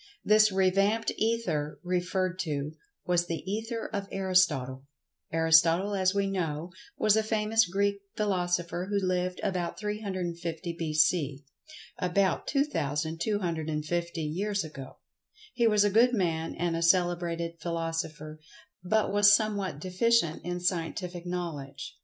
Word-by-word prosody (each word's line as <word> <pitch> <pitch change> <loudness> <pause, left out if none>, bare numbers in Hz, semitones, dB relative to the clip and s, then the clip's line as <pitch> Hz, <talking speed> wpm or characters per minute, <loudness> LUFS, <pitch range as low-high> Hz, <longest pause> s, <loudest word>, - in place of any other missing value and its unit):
This 215 0 +5
revamped 195 +4 +2
Ether, 185 -10 -1
referred 180 0 -1
to, 150 -4 -2 0.3
was 175 -1 +1
the 165 -1 -4
"Ether 225 +4 -3
of 200 -1 -3
Aristotle." 155 -9 +1 0.5
Aristotle, 165 +4 +4
as 190 -1 +2
we 200 0 +2
know, 170 -4 -3 0.3
was 215 -1 +4
a 220 - +3
famous 220 -1 +2
Greek 200 +2 0
philosopher 180 -3 -1
who 205 - +1
lived 185 -1 -1
about 180 -4 -2
350 180 -5 -4
b.c.—about 165 - -1
2250 165 - -1
years 195 +6 -1
ago. 140 -4 -9 0.6
He 235 -2 +3
was 210 -2 +4
a 205 - +3
good 240 +4 +5
man 165 -5 -1
and 170 0 -1
a 165 - -2
celebrated 170 -1 +1
philosopher, 165 -2 -4 0.4
but 210 +2 +1
was 205 0 +6
somewhat 205 -8 -2
deficient 185 -1 +1
in 175 0 -3
scientific 175 0 -2
knowledge. 145 -6 -5
180 Hz, 115 wpm, -29 LUFS, 165-200 Hz, 0.6 s, was